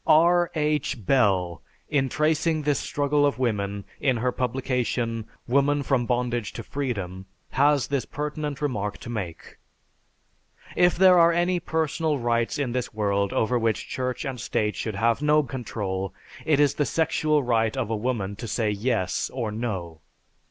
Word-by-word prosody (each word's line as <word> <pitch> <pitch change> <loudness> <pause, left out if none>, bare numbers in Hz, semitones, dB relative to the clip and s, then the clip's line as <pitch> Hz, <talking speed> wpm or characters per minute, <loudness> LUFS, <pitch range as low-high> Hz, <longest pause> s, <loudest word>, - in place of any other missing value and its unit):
R. 170 +2 +5
H. 150 -7 -1
Bell, 95 -10 +2 0.3
in 135 -3 +1
tracing 155 +1 +1
this 145 -1 +1
struggle 145 0 +1
of 145 -2 +2
woman 100 -5 -1
in 130 -3 +1
her 125 +2 0
publication, 125 -3 -1 0.2
"Woman 140 +3 +2
from 125 -3 +1
Bondage 120 -3 -1
to - - -6
Freedom," 95 -9 -4 0.2
has 140 0 +3
this 140 -2 -1
pertinent 150 0 -4
remark 105 -7 -2
to 120 - -8
make. 95 -8 -6 1.2
"If 175 -1 +4
there 185 -1 +7
are 170 0 +6
any 175 +1 +1
personal 160 -1 0
rights 120 -1 0
in 140 -4 -1
this 125 -2 -3
world 100 -2 +1
over 120 +2 +1
which 115 -1 0
Church 130 -1 -3
and 130 -3 -4
State 105 -2 -1
should 110 -3 -3
have 115 +5 +1
no 150 0 +4
control, 100 -8 -4 0.3
it 150 -3 +3
is 145 -1 +4
the 145 - 0
sexual 155 -2 +1
right 115 -1 +1
of 115 -4 -2
a - - +1
woman 105 -3 -2
to 115 - -6
say, 110 0 0
'Yes' 105 -3 -1
or 120 -5 -3
'No.' 95 -8 -4
125 Hz, 160 wpm, -25 LUFS, 110-145 Hz, 1.2 s, there